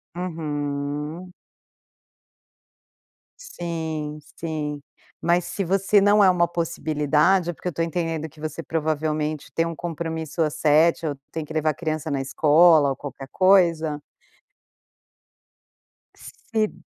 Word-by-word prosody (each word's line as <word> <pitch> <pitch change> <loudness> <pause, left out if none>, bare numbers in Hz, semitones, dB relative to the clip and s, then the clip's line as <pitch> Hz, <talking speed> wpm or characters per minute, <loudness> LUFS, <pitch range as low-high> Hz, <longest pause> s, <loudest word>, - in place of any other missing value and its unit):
Uhum. 150 0 -4 2.1
Sim, 160 - -5 0.2
sim. 150 -3 -4 0.4
Mas 170 0 +2
se 195 - -3
você 195 +3 +3
não 205 +1 +5
é 190 - +7
uma 175 -1 +3
possibilidade 165 +1 +1
é - - -10
porque 175 - -8
eu 180 - -2
tô 165 - -1
entendendo 165 -2 -2
que 155 0 -19
você 155 +1 -5
provavelmente 155 -1 -2
tem 165 - +2
um 165 0 -4
compromisso 160 -1 -4
às 155 -2 0
7h, 160 +2 +3
ou 145 -2 -1 0.2
tem 160 -1 -4
que 155 - -9
levar 155 0 +1
a - - -7
criança 155 0 -3
na 140 -2 -1
escola 150 +2 +5
ou 135 - -1
qualquer 135 0 -8
coisa. 170 -6 +3 2.1
Se 220 -2 -3
160 Hz, 125 wpm, -24 LUFS, 150-175 Hz, 2.1 s, é